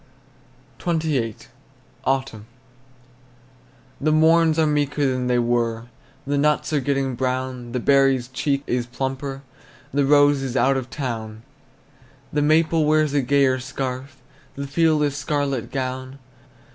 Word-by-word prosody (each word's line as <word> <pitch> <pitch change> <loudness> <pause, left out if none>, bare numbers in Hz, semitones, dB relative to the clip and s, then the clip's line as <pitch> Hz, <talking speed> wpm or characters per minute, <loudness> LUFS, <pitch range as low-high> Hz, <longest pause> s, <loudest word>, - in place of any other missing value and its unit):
XXVIII. 155 - 0 0.7
AUTUMN. 130 -5 -2 1.5
The 155 +2 +2
morns 160 +1 +4
are 160 - +3
meeker 145 -1 0
than 130 -2 0
they 125 0 +2
were, 120 -1 0 0.4
The 140 +1 0
nuts 150 +1 +1
are 150 - +3
getting 135 -1 -1
brown; 130 -1 -3
The 125 - -2
berry's 135 -1 +3
cheek 140 +2 -1
is 120 -1 -1
plumper, 135 +2 -4 0.5
The 140 0 +2
rose 145 -1 +5
is 130 -1 -3
out 135 +1 +3
of 130 -1 -3
town. 115 -6 -5 0.9
The 150 - +1
maple 160 +1 +3
wears 155 -1 +2
a 145 - +3
gayer 135 0 +2
scarf, 130 0 -5 0.4
The 140 - -4
field 155 +2 +2
a 145 - +1
scarlet 140 -2 -2
gown. 130 0 -4
135 Hz, 130 wpm, -22 LUFS, 130-145 Hz, 1.5 s, rose